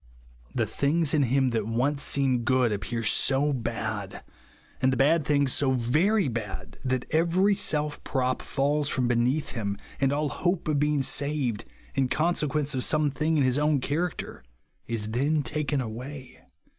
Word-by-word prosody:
The -, -, +1 dB
things 150 Hz, +2 st, 0 dB
in 155 Hz, -, +3 dB
him 130 Hz, 0 st, +2 dB
that 110 Hz, -3 st, -1 dB
once 130 Hz, +6 st, 0 dB
seemed 130 Hz, -5 st, +1 dB
good 130 Hz, -1 st, +3 dB
appear 115 Hz, +3 st, -3 dB
so 140 Hz, +6 st, +2 dB
bad, 110 Hz, -5 st, -4 dB, 0.6 s
and 130 Hz, 0 st, +3 dB
the 130 Hz, -, -1 dB
bad 150 Hz, +5 st, +3 dB
things 140 Hz, -3 st, +2 dB
so 135 Hz, -2 st, +2 dB
very 155 Hz, -, +2 dB
bad, 105 Hz, -6 st, -5 dB
that 130 Hz, -1 st, -1 dB
every 175 Hz, +5 st, +3 dB
self 150 Hz, -5 st, 0 dB
prop 130 Hz, -1 st, -1 dB
falls 145 Hz, +1 st, 0 dB
from 125 Hz, -3 st, 0 dB
beneath 120 Hz, +5 st, +1 dB
him, 100 Hz, -4 st, -3 dB, 0.2 s
and 135 Hz, -1 st, +2 dB
all 145 Hz, +1 st, 0 dB
hope 175 Hz, +1 st, -1 dB
of 150 Hz, -2 st, +1 dB
being 150 Hz, -1 st, +1 dB
saved, 135 Hz, -4 st, -1 dB, 0.3 s
in 135 Hz, -1 st, +1 dB
consequence 150 Hz, -1 st, 0 dB
of 130 Hz, -1 st, -1 dB
some 150 Hz, -2 st, +1 dB
thing 155 Hz, +3 st, 0 dB
in 145 Hz, -, +3 dB
his 130 Hz, +2 st, +2 dB
own 150 Hz, -1 st, +2 dB
character, 145 Hz, -, -3 dB, 0.4 s
is 110 Hz, -2 st, -3 dB
then 145 Hz, +6 st, +1 dB
taken 145 Hz, +1 st, -1 dB
away. 125 Hz, +3 st, -7 dB
135 Hz, 160 wpm, -27 LUFS, 125-150 Hz, 0.6 s, in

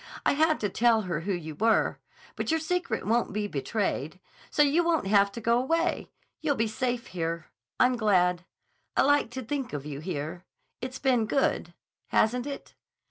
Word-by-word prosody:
I -, -, +5 dB
had 315 Hz, +2 st, +3 dB
to 210 Hz, -, +1 dB
tell 230 Hz, +2 st, +3 dB
her 175 Hz, -6 st, -2 dB
who 185 Hz, +5 st, -3 dB
you 160 Hz, -4 st, -4 dB
were. 220 Hz, +8 st, +2 dB, 0.4 s
But -, -, -3 dB
your 320 Hz, 0 st, +2 dB
secret 320 Hz, -, -2 dB
won't 230 Hz, +3 st, +1 dB
be 210 Hz, 0 st, -1 dB
betrayed. 185 Hz, -, -2 dB, 0.3 s
So 295 Hz, -, +4 dB
you 295 Hz, +4 st, +3 dB
won't 335 Hz, -8 st, +1 dB
have 200 Hz, 0 st, +4 dB
to -, -, -5 dB
go 235 Hz, +2 st, +3 dB
away. 330 Hz, +6 st, 0 dB, 0.3 s
You'll 300 Hz, -3 st, +1 dB
be 225 Hz, -, +1 dB
safe 245 Hz, +2 st, -2 dB
here. 165 Hz, -4 st, -4 dB, 0.3 s
I'm 250 Hz, 0 st, +4 dB
glad. 180 Hz, -5 st, +2 dB, 0.5 s
I -, -, +6 dB
like 285 Hz, -4 st, +3 dB
to 260 Hz, +2 st, -6 dB
think 270 Hz, -, -3 dB
of 145 Hz, -1 st, -4 dB
you 145 Hz, -2 st, -5 dB
here. 165 Hz, +1 st, -5 dB, 0.4 s
It's 255 Hz, +1 st, -5 dB
been 250 Hz, -5 st, +2 dB
good—hasn't 250 Hz, -1 st, -1 dB
it? 280 Hz, -, -7 dB
225 Hz, 175 wpm, -28 LUFS, 180-270 Hz, 0.5 s, I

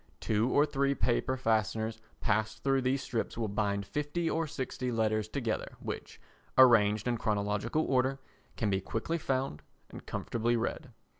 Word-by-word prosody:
Two 110 Hz, +3 st, +1 dB
or 145 Hz, +3 st, +4 dB
three 140 Hz, -1 st, +1 dB
paper 130 Hz, +1 st, +1 dB
fasteners 110 Hz, -1 st, 0 dB, 0.2 s
passed 110 Hz, +1 st, 0 dB
through 135 Hz, -1 st, +3 dB
these 130 Hz, +1 st, 0 dB
strips 115 Hz, -3 st, -3 dB
will 115 Hz, -2 st, 0 dB
bind 100 Hz, -1 st, -1 dB
fifty 150 Hz, +6 st, -2 dB
or 165 Hz, 0 st, 0 dB
sixty 130 Hz, -2 st, -3 dB
letters 110 Hz, -2 st, +1 dB
together, 115 Hz, -2 st, -2 dB
which, -, -, -6 dB, 0.4 s
arranged 110 Hz, -4 st, +6 dB
in 120 Hz, -1 st, +1 dB
chronological 105 Hz, +8 st, 0 dB
order, 130 Hz, +1 st, +2 dB, 0.4 s
can 105 Hz, -3 st, 0 dB
be 95 Hz, 0 st, +1 dB
quickly 140 Hz, -, -2 dB
found 130 Hz, -, -1 dB, 0.3 s
and -, -, -10 dB
comfortably 120 Hz, +1 st, 0 dB
read. 115 Hz, -, -3 dB
115 Hz, 150 wpm, -31 LUFS, 110-135 Hz, 0.4 s, arranged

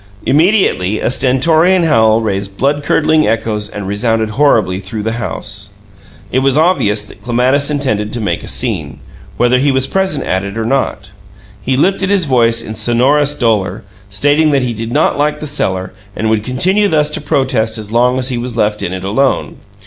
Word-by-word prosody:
Immediately 150 Hz, -, +2 dB
a -, -, 0 dB
stentorian 160 Hz, +8 st, +3 dB
howl 110 Hz, -7 st, +3 dB
raised 100 Hz, -2 st, -3 dB
blood 145 Hz, +2 st, 0 dB
curdling 155 Hz, +1 st, +2 dB
echoes 105 Hz, -1 st, -1 dB
and 100 Hz, -2 st, -6 dB
resounded 110 Hz, +2 st, -1 dB
horribly 110 Hz, -7 st, +2 dB
through 105 Hz, +2 st, -6 dB
the 110 Hz, -, -1 dB
house. 105 Hz, -3 st, -4 dB, 0.6 s
It 130 Hz, -, +2 dB
was 135 Hz, +1 st, +2 dB
obvious 130 Hz, -, +2 dB
that 105 Hz, -, -15 dB
Clematis 130 Hz, +4 st, +1 dB
intended 110 Hz, -8 st, -1 dB
to 120 Hz, -, -3 dB
make 105 Hz, -, -2 dB
a -, -, -9 dB
scene, -, -, -3 dB, 0.4 s
whether 120 Hz, +1 st, +3 dB
he 140 Hz, +2 st, +2 dB
was 130 Hz, 0 st, +1 dB
present 190 Hz, -3 st, -1 dB
at 95 Hz, +1 st, -1 dB
it 100 Hz, +2 st, -6 dB
or 110 Hz, -, -2 dB
not. 115 Hz, -6 st, -2 dB, 0.5 s
He 130 Hz, +4 st, 0 dB
lifted 195 Hz, +5 st, +1 dB
his 200 Hz, -4 st, +2 dB
voice 115 Hz, -4 st, +2 dB
in 110 Hz, -, -6 dB
sonorous 135 Hz, +6 st, +2 dB
dolor, 110 Hz, -5 st, 0 dB, 0.3 s
stating 145 Hz, +9 st, +2 dB
that 140 Hz, -3 st, +1 dB
he 120 Hz, -2 st, -2 dB
did 115 Hz, +1 st, -5 dB
not 140 Hz, -, +1 dB
like 150 Hz, +1 st, 0 dB
the -, -, -6 dB
cellar 95 Hz, -11 st, -2 dB, 0.2 s
and 110 Hz, 0 st, -1 dB
would 110 Hz, -2 st, 0 dB
continue 185 Hz, -, +1 dB
thus 150 Hz, -4 st, +1 dB
to -, -, -4 dB
protest 130 Hz, -6 st, 0 dB
as 105 Hz, -1 st, -8 dB
long 125 Hz, +2 st, +2 dB
as 130 Hz, 0 st, -2 dB
he 125 Hz, -2 st, -2 dB
was 120 Hz, -1 st, -5 dB
left 105 Hz, -1 st, 0 dB
in 90 Hz, -, -3 dB
it 95 Hz, 0 st, -5 dB
alone. 130 Hz, +10 st, 0 dB
120 Hz, 185 wpm, -14 LUFS, 105-145 Hz, 0.6 s, stentorian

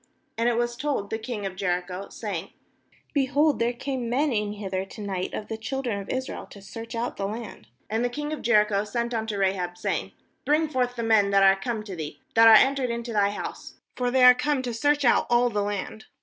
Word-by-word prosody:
2And 230 Hz, -, +2 dB
it 240 Hz, -1 st, +2 dB
was 240 Hz, 0 st, 0 dB
told 260 Hz, -6 st, -2 dB
the 220 Hz, -, -2 dB
king 220 Hz, -3 st, -5 dB
of 190 Hz, -1 st, -4 dB
Jericho, 180 Hz, 0 st, -3 dB
saying: -, -, -5 dB
t -, -, -29 dB, 0.6 s
Behold, 285 Hz, +1 st, +2 dB
there 235 Hz, +1 st, +2 dB
came 250 Hz, -1 st, -4 dB
men 275 Hz, +3 st, +1 dB
in 210 Hz, -1 st, -1 dB
lather 190 Hz, -2 st, -2 dB
to 195 Hz, -, -12 dB
night 195 Hz, -3 st, -3 dB
of 210 Hz, -, -5 dB
the 220 Hz, -, -5 dB
children 235 Hz, -2 st, -3 dB
of 195 Hz, -, -11 dB
Israel 260 Hz, 0 st, -4 dB
to 200 Hz, -, -13 dB
search 225 Hz, +4 st, -8 dB
out 235 Hz, +1 st, -3 dB
the 195 Hz, -, -2 dB
land.' 210 Hz, -, -7 dB, 0.2 s
3And 220 Hz, +1 st, 0 dB
the 245 Hz, -, +1 dB
king 295 Hz, +4 st, -4 dB
of 310 Hz, -, -5 dB
Jericho 210 Hz, -3 st, +3 dB
sent 235 Hz, +3 st, -2 dB
unto 220 Hz, -2 st, -2 dB
Rahab, 190 Hz, -2 st, -1 dB
saying: -, -, -1 dB
1 -, -, -18 dB, 0.3 s
Bring 305 Hz, +2 st, +2 dB
forth 250 Hz, -3 st, 0 dB
the 235 Hz, -, -3 dB
men 220 Hz, -3 st, +4 dB
that 195 Hz, 0 st, +4 dB
are 195 Hz, 0 st, +7 dB
come 215 Hz, +3 st, -3 dB
to 200 Hz, -3 st, -7 dB
thee, 150 Hz, -3 st, -6 dB
that 225 Hz, 0 st, +7 dB
are 225 Hz, -, +10 dB
entered 270 Hz, +1 st, +4 dB
into 235 Hz, 0 st, -4 dB
thy 200 Hz, -1 st, +3 dB
house; 205 Hz, -, -7 dB, 0.2 s
for 250 Hz, -1 st, 0 dB
they 255 Hz, +1 st, +3 dB
are 250 Hz, 0 st, +10 dB
come 285 Hz, +1 st, 0 dB
to 245 Hz, -2 st, -3 dB
search 290 Hz, +4 st, +1 dB
out 240 Hz, -, +4 dB
all 240 Hz, 0 st, +3 dB
the 205 Hz, -1 st, 0 dB
land.' 205 Hz, +1 st, -4 dB
230 Hz, 235 wpm, -26 LUFS, 200-250 Hz, 0.6 s, are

